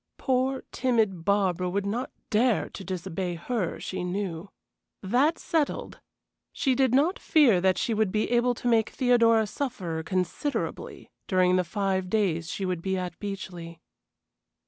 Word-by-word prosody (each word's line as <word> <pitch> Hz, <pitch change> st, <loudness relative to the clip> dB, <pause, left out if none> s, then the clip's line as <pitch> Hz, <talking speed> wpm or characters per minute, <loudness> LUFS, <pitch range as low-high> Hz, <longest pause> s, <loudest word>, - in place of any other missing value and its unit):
Poor, 260 Hz, +1 st, 0 dB
timid 225 Hz, -9 st, +1 dB
Barbara 185 Hz, -3 st, +1 dB
would 200 Hz, +2 st, -1 dB
not 235 Hz, +6 st, -2 dB, 0.2 s
dare 225 Hz, +1 st, +2 dB
to 195 Hz, -, -9 dB
disobey 180 Hz, 0 st, -4 dB
her, 185 Hz, +1 st, -3 dB
she 185 Hz, -1 st, -4 dB
knew. 180 Hz, -1 st, -3 dB, 0.5 s
That 260 Hz, -, +2 dB
settled, 315 Hz, -3 st, -2 dB, 0.5 s
she 265 Hz, -, +1 dB
did 260 Hz, -1 st, +2 dB
not 315 Hz, +8 st, +2 dB
fear 245 Hz, -, +4 dB
that 185 Hz, 0 st, +3 dB
she 230 Hz, -, 0 dB
would 215 Hz, -3 st, +1 dB
be 215 Hz, +3 st, 0 dB
able 245 Hz, 0 st, +3 dB
to 245 Hz, -, -4 dB
make 225 Hz, -2 st, +3 dB
Theodora 230 Hz, -3 st, +3 dB
suffer 195 Hz, -, -4 dB
considerably 185 Hz, -, -3 dB, 0.2 s
during 185 Hz, -1 st, +3 dB
the 185 Hz, -, +3 dB
five 190 Hz, 0 st, -1 dB
days 180 Hz, -6 st, 0 dB
she 195 Hz, -, -3 dB
would 180 Hz, -2 st, -2 dB
be 190 Hz, +1 st, -1 dB
at 180 Hz, -1 st, -5 dB
Beechleigh. 180 Hz, -4 st, -6 dB
200 Hz, 145 wpm, -27 LUFS, 180-245 Hz, 0.5 s, fear